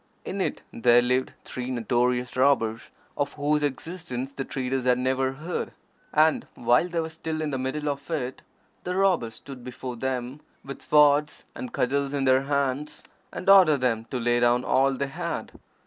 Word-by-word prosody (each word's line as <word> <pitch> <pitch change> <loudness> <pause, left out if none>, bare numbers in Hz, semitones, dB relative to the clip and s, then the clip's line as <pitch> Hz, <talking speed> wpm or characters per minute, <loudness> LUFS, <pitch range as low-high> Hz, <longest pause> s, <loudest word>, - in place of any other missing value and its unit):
In - - -3
it - - -2
there 120 +1 +4
lived 125 +1 0
three 125 0 -5
notorious 125 +1 0
robbers, 125 -4 +2 0.3
of 145 - -2
whose 150 +1 +1
existence 145 -2 -4
the 140 -1 -4
traders 130 -1 -3
had 125 -1 +4
never 130 +1 0
heard, 160 +6 -4 0.4
and 155 +1 +3
while 120 +8 +3
they 170 -1 -2
were 160 - -1
still 160 -1 -5
in 155 -1 -2
the 135 - -2
middle 150 +3 -3
of 140 +1 -3
it 130 -6 -3 0.4
the 180 +1 -3
robbers 180 -13 +1
stood 130 +1 -11
before 125 0 -7
them, 130 +2 -3 0.3
with 140 0 -8
swords 150 0 +3
and 255 -2 -7
cudgels 140 - 0
in 140 -1 0
their 130 0 +4
hands, 140 +1 -2 0.3
and - - -7
ordered 180 -8 +7
them 115 -3 0
to 125 - -4
lay 120 0 +2
down 120 +1 +3
all 135 +1 +3
they 140 +1 -2
had. 135 - -4
135 Hz, 175 wpm, -26 LUFS, 125-150 Hz, 0.4 s, ordered